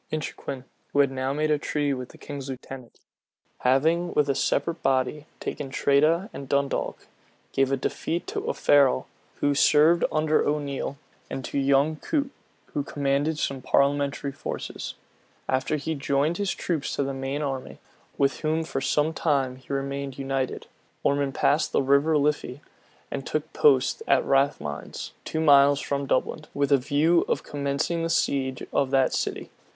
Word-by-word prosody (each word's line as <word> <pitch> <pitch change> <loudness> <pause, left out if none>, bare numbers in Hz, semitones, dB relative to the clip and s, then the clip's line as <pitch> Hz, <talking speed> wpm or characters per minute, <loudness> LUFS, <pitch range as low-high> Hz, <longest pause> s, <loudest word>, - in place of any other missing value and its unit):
Inchiquin, 140 -3 -4 0.3
who 145 - +1
had 140 -1 +2
now 130 0 -2
made 155 +2 0
a 150 - +2
treaty 145 -1 -1
with 125 -1 -5
the - - -15
king's 140 -2 -7
lieutenant, 130 -1 -9 0.6
having, 160 +7 +2
with 150 -1 +3
a - - +4
separate 165 +4 0
body, 135 +3 0
taken 140 - -5
Tredah 155 +7 +2
and 135 -1 -8
Dundalk, 140 -1 -1 0.5
gave 135 0 +1
a 135 - +2
defeat 165 +5 -2
to 410 0 -3
Offarrell, 145 - +3 0.4
who 145 - +3
served 155 +4 +5
under 155 0 +2
O'Neal, 140 -2 -2 0.3
and 130 - -5
to 140 - -2
young 140 +3 +3
Coot, 285 - -1 0.4
who 145 - 0
commanded 145 +2 0
some 135 -3 -2
parliamentary 140 +1 +1
forces. 140 - -6 0.5
After 130 +3 0
he 150 +2 -3
had 155 - -3
joined 140 +5 +1
his 200 -1 -1
troops 160 -5 -2
to - - 0
the 135 0 -3
main 135 +2 -3
army, 135 -2 -4 0.4
with 140 -1 +1
whom 160 +1 0
for 135 -4 -3
some 150 +3 +1
time 135 -6 0
he 130 - -13
remained 140 0 -3
united, 135 -1 -2 0.4
Ormond 140 -1 +1
passed 145 +3 +2
the - - +3
River 140 +3 +3
Liffy, 145 -2 -1 0.5
and 135 - -3
took 155 +3 -3
post 135 -3 +3
at - - +3
Rathmines, 135 - -1
two 160 - -2
miles 140 -2 +6
from 140 -1 -2
Dublin, 150 +4 0
with 140 0 +1
a 140 - +7
view 145 +6 +2
of - - -1
commencing 140 +4 -2
the 165 - -1
siege 130 -5 0
of 135 - +2
that 135 -1 +3
city. - - -3
140 Hz, 160 wpm, -26 LUFS, 135-150 Hz, 0.6 s, a